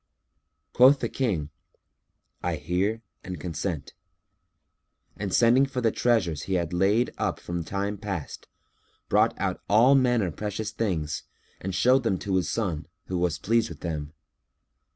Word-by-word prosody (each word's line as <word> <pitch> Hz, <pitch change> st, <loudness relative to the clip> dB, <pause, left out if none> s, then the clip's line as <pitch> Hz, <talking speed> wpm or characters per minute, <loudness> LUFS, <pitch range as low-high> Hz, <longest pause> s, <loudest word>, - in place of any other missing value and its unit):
Quoth 135 Hz, +3 st, +7 dB
the -, -, -2 dB
King, 90 Hz, -, -1 dB, 0.9 s
"I 90 Hz, -1 st, -1 dB
hear 100 Hz, +8 st, -1 dB, 0.2 s
and 90 Hz, -4 st, -6 dB
consent;" 85 Hz, -1 st, -4 dB, 1.2 s
and 100 Hz, -2 st, -4 dB
sending 120 Hz, +6 st, +5 dB
for 130 Hz, -1 st, -3 dB
the 115 Hz, -3 st, +2 dB
treasures 95 Hz, -11 st, +1 dB
he 95 Hz, -, +1 dB
had 85 Hz, -2 st, -1 dB
laid 100 Hz, +7 st, +2 dB
up -, -, -1 dB
from 85 Hz, -1 st, -4 dB
time 100 Hz, +3 st, -3 dB
past, 100 Hz, -7 st, -5 dB, 0.6 s
brought -, -, +3 dB
out -, -, -2 dB
all 115 Hz, +6 st, +6 dB
manner 120 Hz, -8 st, +3 dB
precious 105 Hz, +4 st, -4 dB
things 80 Hz, -9 st, -2 dB, 0.3 s
and 95 Hz, 0 st, -4 dB
showed 130 Hz, +7 st, +4 dB
them 110 Hz, -6 st, 0 dB
to 95 Hz, +1 st, -1 dB
his 90 Hz, -, 0 dB
son, 90 Hz, -9 st, -2 dB, 0.2 s
who 90 Hz, -1 st, -1 dB
was 85 Hz, -2 st, 0 dB
pleased 115 Hz, +1 st, +1 dB
with -, -, -10 dB
them. 75 Hz, -3 st, -4 dB
100 Hz, 145 wpm, -26 LUFS, 85-115 Hz, 1.2 s, Quoth